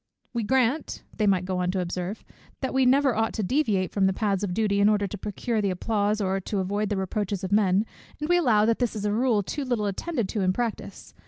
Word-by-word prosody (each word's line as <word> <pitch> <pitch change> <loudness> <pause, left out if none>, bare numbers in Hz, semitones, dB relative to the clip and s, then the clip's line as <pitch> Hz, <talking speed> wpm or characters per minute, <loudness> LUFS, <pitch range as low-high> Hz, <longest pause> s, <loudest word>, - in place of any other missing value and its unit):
We 235 - -1
grant," 260 +5 0
they 215 - +1
might 185 -2 +2
go 185 -1 -2
on 180 0 0
to 190 - 0
observe, 180 +3 -4 0.4
"that 265 - -2
we 265 -1 +3
never 270 -1 +4
ought 225 0 0
to 215 - -2
deviate 210 -5 +1
from 195 -2 +2
the 190 - +1
paths 200 -1 0
of 200 - -1
duty 200 +1 +1
in 200 +1 +5
order 205 -1 +2
to 200 - -5
procure 215 +3 -2
the 200 - +1
applause 205 +3 0
or 195 -1 0
to 200 +2 -4
avoid 200 +2 -1
the 205 - -1
reproaches 195 0 -2
of 190 - -3
men, 200 0 +3 0.3
and 300 - -3
we 350 +1 +4
allow 225 -11 +3
that 230 0 +1
this 245 -3 0
is 210 -1 -3
a 205 - +1
rule 230 -2 +2
too 285 +9 -4
little 245 -5 -1
attended 230 - -2
to 210 - -2
in 185 -1 +2
practice. 235 0 -4
210 Hz, 245 wpm, -26 LUFS, 195-235 Hz, 0.4 s, in